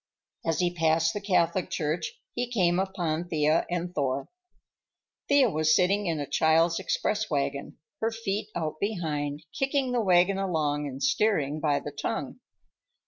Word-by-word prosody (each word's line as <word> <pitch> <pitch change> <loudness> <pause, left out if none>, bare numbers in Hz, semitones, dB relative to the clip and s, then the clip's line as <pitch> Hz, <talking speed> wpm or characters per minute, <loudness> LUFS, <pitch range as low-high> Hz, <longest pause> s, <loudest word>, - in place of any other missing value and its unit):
As 165 -1 0
he 175 -1 +1
passed 165 0 +2
the 205 - -4
Catholic 180 -2 +1
Church 155 0 -2 0.2
he 245 0 -2
came 180 -7 +2
upon 175 -4 -2
Thea 155 0 +2
and 175 0 -3
Thor. 135 -2 -1 1.0
Thea 285 -2 +5
was 155 0 +3
sitting 200 +2 +2
in 165 -2 -1
a 145 - -2
child's 160 +4 +3
express 210 +2 -1
wagon, 140 -1 -2 0.2
her 225 - +1
feet 220 -2 -3
out 155 -2 -3
behind, 155 -7 -2
kicking 270 -1 0
the 245 -1 +1
wagon 185 0 +3
along 150 -6 0
and 135 0 -6
steering 155 -3 +1
by 145 -2 +1
the 145 - -7
tongue. 145 0 -4
170 Hz, 150 wpm, -27 LUFS, 150-195 Hz, 1.0 s, Thea